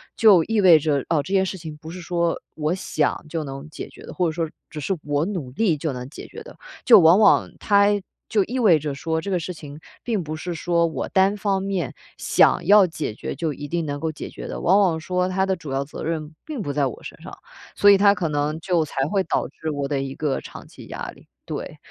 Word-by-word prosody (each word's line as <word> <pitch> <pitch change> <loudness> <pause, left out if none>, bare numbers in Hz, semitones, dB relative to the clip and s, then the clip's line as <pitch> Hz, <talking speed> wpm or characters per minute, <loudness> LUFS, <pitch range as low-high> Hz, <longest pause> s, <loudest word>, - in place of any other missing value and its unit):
就 200 -7 +6
意 220 +2 +1
味 180 -4 +8
着， 145 -3 0
哦， 160 -3 +2
这 190 - -5
件 190 -1 +4
事 190 - -4
情 160 -3 -8
不 155 +1 -11
是 180 +2 -8
说 170 -1 -1 0.2
我 155 +1 -1
想 155 -5 -1
就 160 0 -3
能 135 +1 -7
解 - - -7
决 - - -15
的， - - -9
或 180 -2 +1
者 - - -1
说 165 0 -2 0.2
只 155 - -7
是 170 +7 -1
我 145 +1 0
努 175 -9 -4
力 175 - +1
就 155 +1 -2
能 125 0 -6
解 - - -10
决 465 - -10
的。 - - -13 0.3
就 235 - +9
往 165 +1 +7
往 215 - +5
它 200 -1 +4 0.4
就 210 -3 +3
意 250 +6 -3
味 200 -9 +5
着 150 -1 -4
说， 160 +3 -2
这 195 +5 -5
个 180 - +1
事 170 +2 -5
情 150 -3 -10 0.2
并 220 -6 -1
不 155 0 -5
是 175 +3 -5
说 170 +1 +1
我 160 -5 -3
单 195 +1 +3
方 195 -2 -1
面 195 -3 -2 0.2
想 - - +3
要 205 0 +7
解 155 -10 -4
决 - - -5
就 165 -3 -2
一 145 +1 -7
定 170 +2 -2
能 145 0 -3
够 160 +1 -2
解 155 - -8
决 - - -8
的。 - - -6
往 190 +4 +4
往 175 -5 +2
说， 180 +2 -1
它 190 +1 0
的 190 - +1
主 155 -6 -9
要 135 +1 0
责 140 - -8
任 155 -1 -4
并 300 -7 -5
不 145 - -3
在 140 0 +1
我 125 - -5
身 - - -10
上， - - -9 0.4
所 205 - +5
以 200 - +8
它 200 0 +5
可 180 -4 -2
能 150 +1 -1
就 170 -1 +1
才 135 -2 -2
会 195 +3 +1
导 - - -1
致 160 - -5
我 145 -1 -2
的 140 -1 -1
一 135 -1 -5
个 150 -3 -1
长 - - -11
期 - - -13
压 - - -6
力， - - -19 0.2
对。 - - -6
165 Hz, 270 characters per minute, -23 LUFS, 150-190 Hz, 0.4 s, 就